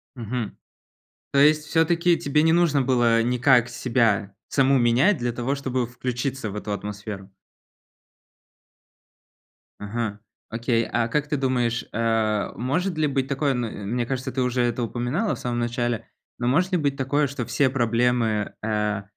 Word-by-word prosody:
Мгм. 120 -2 -4 0.8
То 140 - +2
есть 150 +2 +5
всё-таки 170 +2 +2
тебе 145 +2 +1
не 160 +1 +4
нужно 165 -5 +3
было 120 -3 +3
никак 125 0 +3
себя 115 -5 0
саму 135 0 +3
менять 125 - +3
для 120 0 -1
того, 120 +3 -2
чтобы 130 -3 -2
включиться 125 0 -3
в 100 - -7
эту 105 0 -4
атмосферу? 100 0 -6 2.5
Мгм, 105 0 -4 0.3
окей, 115 0 0
а 120 -1 0
как 150 +5 -1
ты 150 - -1
думаешь, 125 -3 0
э, 110 -2 0
может 160 - -1
ли 155 -1 +2
быть 135 -2 -1
такое, 140 +1 0
м 115 -5 -4
мне 120 0 0
кажется, 130 +1 -3
ты 130 - -2
уже 125 0 +1
это 120 0 0
упоминала 125 - -1
в - - -12
самом 120 -1 -2
начале, 120 -1 -2 0.3
но 120 - -2
может 180 +9 +2
ли 180 - +3
быть 140 -4 -1
такое, 145 +2 +1
что 130 -3 -4
все 125 +3 +2
проблемы, 120 -3 +1
э, 105 -2 -1
125 Hz, 155 wpm, -24 LUFS, 115-140 Hz, 2.5 s, есть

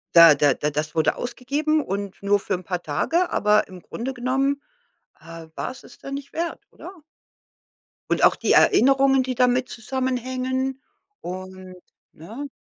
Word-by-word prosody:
da 170 -2 +10
da 145 -1 +3
da 150 - -2
das 150 +2 -3
wurde 160 - +2
ausgegeben 285 +5 -1
und 200 0 -5
nur 205 0 +3
für 195 - -4
'n 185 0 -3
paar 180 0 -3
Tage, 330 - 0
aber 210 0 +3
im 185 -1 -12
Grunde 250 +8 -5
genommen, 270 +3 0 0.6
äh, 165 -1 -11
war - - -4
es 260 - -13
es 245 - -15
dann 275 - -8
nicht 280 0 -8
wert, 335 +1 -3
oder? - - -11 1.2
Und - - +1
auch - - +6
die - - -1
Erinnerungen, 270 +1 +5
die 255 - -3
damit 250 +1 +2
zusammenhängen 260 +2 -2 0.4
und 185 0 -8 0.4
ne? 225 - -8
245 Hz, 155 wpm, -23 LUFS, 185-270 Hz, 1.2 s, da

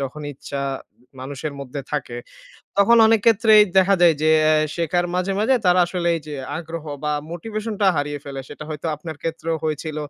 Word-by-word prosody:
যখন 140 +2 -5
ইচ্ছা 140 +1 -6 0.6
মানুষের 140 +2 -5
মধ্যে 140 +1 -6
থাকে, 130 -5 -3 0.6
তখন 235 +4 +6
অনেক 225 -1 +4
ক্ষেত্রেই 220 -1 +6 0.2
দেখা 190 +1 +4
যায় 170 -2 +6
যে 155 - +4
অ্যা 155 0 +4 0.2
শেখার 175 +1 0
মাঝে, 185 +2 0
মাঝে 225 +5 +3
তারা 180 0 +5
আসলে 175 -1 -2
এই - - -6
যে 150 - -6 0.2
আগ্রহ 165 -1 -7 0.2
বা 150 - 0 0.2
motivation 215 +5 -5
টা 195 - +5
হারিয়ে 145 0 -2
ফেলে 140 -1 -6
সেটা 155 - -9
হয়তো 155 +1 -5
আপনার 155 0 -8
ক্ষেত্রেও 165 0 -2
হয়েছিল। 155 0 -3
165 Hz, 180 wpm, -21 LUFS, 150-190 Hz, 0.6 s, তখন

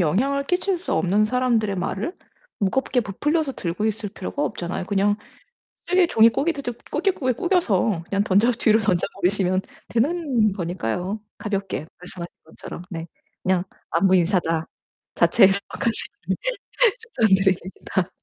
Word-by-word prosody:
영향을 265 - +1
끼칠 360 +3 0
수 365 - -4
없는 200 +3 +3
사람들의 225 -4 +1
말을 195 - -3 0.4
무겁게 250 +5 +1
부풀려서 290 - -1
들고 185 -1 -3
있을 215 -1 -1
필요가 210 +8 -4
없잖아요. 180 -4 -3
그냥 205 +1 +2 0.7
쓰게 365 -1 +4
종이 225 -6 +6
꾸깃드디 280 -1 -1 0.2
꾸깃꾸깃 300 - 0
꾸겨서 225 - +1
그냥 200 0 +1
던져 205 +5 +4
뒤로 225 -2 +3
던져 190 -4 +1
버리시면 185 0 +1 0.3
되는 250 - +1
거니까요. 180 - -3 0.2
가볍게 195 -6 -3
말씀하신 180 -1 -7 0.2
것처럼 160 +1 -9
네. 165 -1 -5 0.4
그냥 185 -1 +1 0.3
'안부 185 +3 +3
인사다.' 170 -3 +1 0.5
자체해석하시길 200 +5 +2 0.8
추천드립니다. 190 - +1
205 Hz, 325 characters per minute, -23 LUFS, 185-255 Hz, 0.8 s, 종이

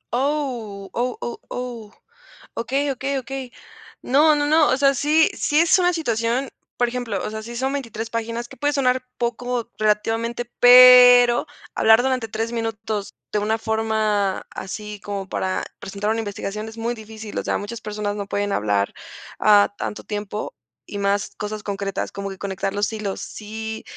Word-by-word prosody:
Oh. 245 -8 -2
Oh, 245 +1 -1
oh, 240 - -5
oh. 240 -4 -6 0.6
Okey, 270 +5 -1
okey, 270 +1 -2
okey. 260 0 -6 0.5
No, 300 +4 +5
no, 290 0 +1
no. 310 0 +4
O 260 - +2
sea, 275 0 +4
sí 305 +4 +3
sí, 295 - +1
es 335 +3 +5
una 355 0 +3
situación 240 -4 -1 0.3
por 245 - +2
ejemplo, 235 -5 -3
o - - -2
sea, 220 0 -5
sí 235 +2 -8
son 265 +3 -1
23 230 -5 -4
páginas, 230 +1 -3
que - - -11
puede 290 +4 0
sonar 255 -2 +1
poco, 240 0 -2
relativamente, 225 +3 0
pero, 245 0 +8 0.3
hablar 225 +2 +5
durante 255 -3 0
3 225 +2 -3
minutos, 220 -3 -3 0.2
de 210 - +1
una 215 +2 0
forma 220 -3 0
así 210 +2 -7
como 200 -2 -5
para 185 -1 -2 0.2
presentar 200 +2 -4
una 225 - 0
investigación, 210 0 -4
es 225 - -13
muy 230 +1 -1
difícil. 220 -1 -9
O - - -4
sea, - - 0
muchas 220 +3 -6
personas 210 -1 -3
no 200 -1 -4
pueden 205 0 -1
hablar, 100 - 0 0.5
ah, 205 -1 +5
tanto 210 - -4
tiempo, 210 0 -5 0.3
y 205 - -7
más 200 0 0
cosas 210 0 -5
concretas. 200 -1 -3
Como 200 0 -5
que 195 - -8
conectar 195 0 -3
los 205 +2 0
hilos. 210 -3 -4
Sí, 220 +1 -6
225 Hz, 170 wpm, -22 LUFS, 210-250 Hz, 0.6 s, pero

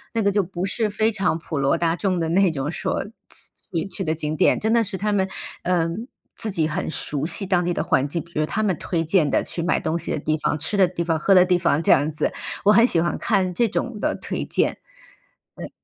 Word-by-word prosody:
那 225 - +1
个 200 - +3
就 205 0 +2
不 185 0 -4
是 215 +2 0
非 215 +2 +1
常 195 -6 0
普 160 -3 -5
罗 135 0 +2
大 165 -1 +1
众 185 -1 -1
的 165 - -1
那 190 +2 +3
种 145 0 -3
说 - - -2 0.7
去 170 +1 -1
去 195 0 -4
的 160 -1 -1
景 155 0 -3
点， - - +3
真 220 +1 0
的 230 -1 +4
是 190 -2 -2
他 210 +2 -1
们， 190 -1 +1 0.3
嗯， 180 +6 -1 0.3
自 220 - -2
己 160 -4 +1
很 160 0 -3
熟 145 -2 -2
悉 195 +4 +1
当 180 -2 +1
地 175 0 0
的 - - -1
环 130 - +1
境。 170 +1 -2
比 170 - -18
如 155 - +2
他 215 - -2
们 190 -7 0
推 165 -2 -2
荐 160 -3 +2
的 - - +2
去 170 - -4
买 175 - +1
东 160 +1 -1
西 - - -5
的 155 - -1
地 155 +1 -1
方、 150 - -1
吃 160 +7 -2
的 195 -2 +5
地 175 -1 -5
方、 165 -2 +1
喝 195 +5 +3
的 180 -1 +7
地 180 -1 +3
方 165 -3 +1
这 - - +3
样 145 +3 +2
子， 150 - +1 0.3
我 210 - +6
很 230 +3 +6
喜 170 - +2
欢 170 - 0
看 190 -5 0
这 235 +6 +2
种 225 +1 -3
的 - - 0
推 - - -4
荐。 - - +1 0.8
嗯。 - - -6
175 Hz, 275 characters per minute, -22 LUFS, 160-200 Hz, 0.8 s, 的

